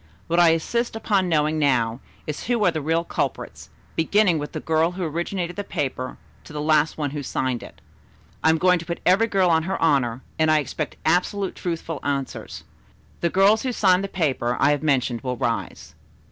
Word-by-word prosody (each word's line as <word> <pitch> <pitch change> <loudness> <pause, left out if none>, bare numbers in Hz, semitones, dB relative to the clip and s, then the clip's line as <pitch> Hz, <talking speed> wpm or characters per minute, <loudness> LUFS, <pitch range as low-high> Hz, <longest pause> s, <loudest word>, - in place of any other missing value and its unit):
What 170 +1 +1
I 170 -1 +7
insist 230 +9 0
upon 200 -4 +1
knowing 155 -1 +1
now, 120 -5 +1 0.3
is 150 - -5
who 235 -4 +1
are 180 - +4
the 160 -2 -3
real 165 +3 +1
culprits, - - -4 0.3
beginning 180 0 +3
with 145 - -6
the - - -3
girl 160 +2 +1
who 185 0 -4
originated 175 +2 -3
the 205 - -2
paper 130 -7 -3 0.3
to - - -13
the 150 - -5
last 155 0 +2
one 145 -3 -2
who 145 0 -4
signed 130 -2 -2
it. - - -13 0.6
I - - +5
am 160 - +4
going 180 +1 +3
to 170 - -8
put 170 - -3
every 195 +5 +4
girl 190 -4 +2
on 160 -1 +4
her 190 +4 -3
honor, 135 -6 +1 0.2
and 155 0 +3
I 155 - +5
expect 150 0 -3
absolutely 185 +4 +1
truthful 165 -3 -3
answers. 140 -2 -4 0.6
The 170 - +1
girls 200 +5 +4
who 260 - -1
signed 190 -5 +3
the - - -2
paper 135 -10 -1
I - - +4
have 145 - 0
mentioned 130 -6 +1
will 125 -2 -3
rise." - - -3
160 Hz, 200 wpm, -23 LUFS, 145-185 Hz, 0.6 s, I